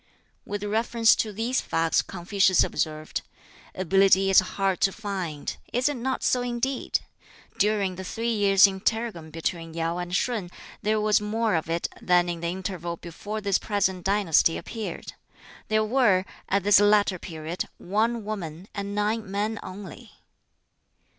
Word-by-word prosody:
With 205 0 -4
reference 225 +2 +3
to 215 - -1
these 230 +5 -1
facts 165 0 +1
Confucius 190 +1 +2
observed, 155 -1 -2 0.5
"Ability 195 +1 +4
is 190 - +8
hard 190 0 -1
to 195 - +4
find. 185 -8 -4 0.2
Is 250 +3 +1
it 295 - +1
not 260 +2 -2
so 250 - +2
indeed? 245 +2 -1 0.6
During 200 -3 +1
the 190 - -5
three 230 +5 -2
years' 200 -2 +6
interregnum 195 -3 -1
between 165 0 -4
Yau 165 +1 -1
and 175 0 -3
Shun 215 -5 -1 0.3
there 215 +1 +1
was 210 0 +3
more 220 +1 0
of 160 -1 -1
it 170 +1 0
than 175 -1 +3
in 170 -1 -3
the 170 - -2
interval 175 -1 -4
before 205 +7 -6
this 200 -2 +1
present 190 -3 -1
dynasty 195 -5 +3
appeared. 225 -2 -6 0.5
There 215 0 +2
were, 215 -6 +3 0.2
at 200 0 +1
this 205 -1 +6
latter 205 -2 +3
period, 165 +1 -5
one 220 +4 -1
woman, 185 -4 -6
and 200 0 -4
nine 210 0 -1
men 210 +3 -2
only. 205 +5 -10
200 Hz, 145 wpm, -26 LUFS, 180-215 Hz, 0.6 s, is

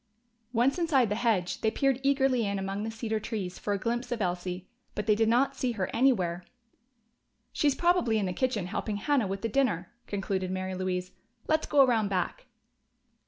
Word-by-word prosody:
Once 255 +7 +2
inside 280 -9 +3
the - - +1
hedge 215 -6 0
they 220 - +3
peered 270 +2 +1
eagerly 270 -3 +2
in 200 -1 -1
among 195 +1 -3
the 220 - -3
cedar 225 -1 -2
trees 205 -5 -4
for 205 - -3
a 200 - +1
glimpse 240 +4 -2
of 240 - -1
Elsie. 180 -1 -3 0.3
But 210 - -2
they 215 - +4
did 220 +1 +2
not 270 +4 +2
see 255 -2 -1
her 195 -4 -2
anywhere. 185 -9 +2 1.1
"She's 290 -2 +2
probably 345 -10 +2
in 205 - 0
the 180 - -2
kitchen 230 -3 -1
helping 205 +3 -3
Hannah 265 -1 +1
with 195 +2 -4
the - - +1
dinner," 215 -8 0
concluded 195 -2 -2
Mary 185 0 -3
Louise. 185 0 -2 0.4
"Let's 315 0 +1
go 280 -2 +6
around 225 -5 +2
back." 195 - -2
220 Hz, 185 wpm, -29 LUFS, 190-255 Hz, 1.1 s, go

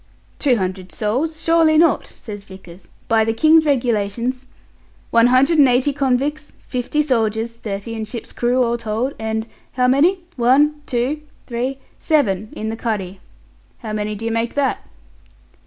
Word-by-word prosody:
"Two 270 -4 +3
hundred 185 -2 -4
souls! 260 - -2
Surely 325 -1 +3
not," 330 +1 +3
says 205 -3 -9
Vickers. 190 -2 -14 0.2
"By 225 -1 +3
the 225 +1 -1
King's 315 +5 +5
Regulations 245 0 0 0.3
" - - -33
"One 230 +1 +5
hundred 275 +6 +4
and 280 - +7
eighty 255 +3 +2
convicts, 285 +2 -1
fifty 255 +4 -1
soldiers, 230 -3 -1
thirty 205 +1 -5
in 220 -1 -4
ship's 230 +2 -7
crew, 250 +1 +1
all 235 0 0
told, 230 +5 -2
and 220 0 -2 0.3
how 250 -1 +2
many? 325 +9 +3 0.2
one, 290 +5 +3
two 255 +5 -1 0.2
three 250 +2 -3 0.2
seven 215 - +1
in 220 - -4
the 225 - -3
cuddy. 200 -5 -3 0.6
How 220 -3 -6
many 210 0 -2
do 220 +2 -6
you 230 - -1
make 230 +1 -1
that?" 285 -2 +1
240 Hz, 155 wpm, -20 LUFS, 220-280 Hz, 0.6 s, and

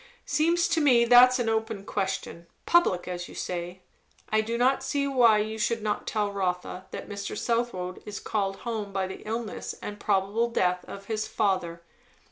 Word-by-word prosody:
"'Seems 340 +4 +2
to 325 - +1
me 245 -5 +5
that's 250 +1 +7
an 240 -2 -1
open 220 -2 -1
question 190 -4 -3 0.2
public, 345 - +3
as 175 -1 -5
you - - -11
say. 175 +1 -5 0.5
I 215 0 +3
do 230 +2 -3
not 260 +3 +3
see 280 +1 0
why 245 -6 +5
you 215 +1 -2
should 220 +1 0
not 210 -1 -2
tell 210 -2 0
Rotha 185 -1 -3
that - - -7
Mr. 200 -1 -5
Southwode 230 -7 -2
is 210 -1 -6
called 195 -3 -1
home 220 -4 -3
by 195 -1 -1
the 190 - -7
illness 225 0 -4
and 205 0 -7
probable 205 +4 +1
death 180 -5 +1
of 200 0 -9
his 220 0 -2
father. 180 -5 -1
210 Hz, 175 wpm, -27 LUFS, 190-235 Hz, 0.5 s, that's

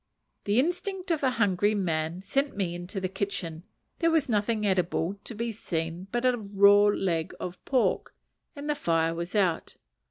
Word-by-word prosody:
The 205 +4 +3
instinct 360 +4 -1
of 320 - +1
a 265 - +3
hungry 205 -3 +2
man 170 -2 -1
sent 275 +4 -1
me 185 -4 -1
into 175 +3 -5
the 185 - -1
kitchen; 180 -3 -4 0.3
there 330 - +3
was 320 -3 +2
nothing 215 -1 0
eatable 185 -1 0
to 235 - -6
be 230 +2 -2
seen 170 -3 -4
but 240 +1 -1
a 250 -1 +3
raw 200 0 +5
leg 180 -5 0
of 180 0 -6
pork, 260 -3 +1 0.4
and 285 0 -6
the 300 - +2
fire 165 - +1
was 170 +4 -5
out. 185 -5 +1
200 Hz, 170 wpm, -28 LUFS, 175-240 Hz, 0.4 s, raw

